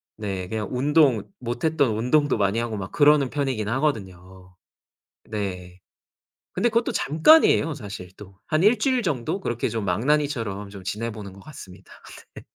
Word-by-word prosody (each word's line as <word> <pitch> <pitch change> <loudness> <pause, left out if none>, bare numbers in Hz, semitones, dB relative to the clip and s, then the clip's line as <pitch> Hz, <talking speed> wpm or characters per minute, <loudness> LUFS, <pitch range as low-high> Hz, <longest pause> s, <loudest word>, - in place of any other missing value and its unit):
네. 95 -4 -5
그냥 105 0 -3
운동 135 -3 +3 0.2
못 120 0 -5
했던 145 -8 +1
운동도 135 +3 +2
많이 100 +2 +1
하고 115 -3 -3
막 95 -1 -6
그러는 145 -3 +4
편이긴 130 -7 -2
하거든요. 95 -8 -4 0.7
네. 90 -4 -6 0.7
근데 215 +6 +1
그것도 230 +1 0
잠깐이에요 160 - +4
사실 100 -8 -8
또. 95 -2 -14
한 155 +2 +1
1 215 +2 +4
주일 255 -1 +1
정도 150 +2 -2
그렇게 120 -10 -2
좀 110 -2 -3
망나니처럼 115 - -1
지내보는 105 -2 -5
것 100 - -14
같습니다. 95 -10 -13 0.4
네. - - -9
115 Hz, 305 characters per minute, -24 LUFS, 100-150 Hz, 0.7 s, 그러는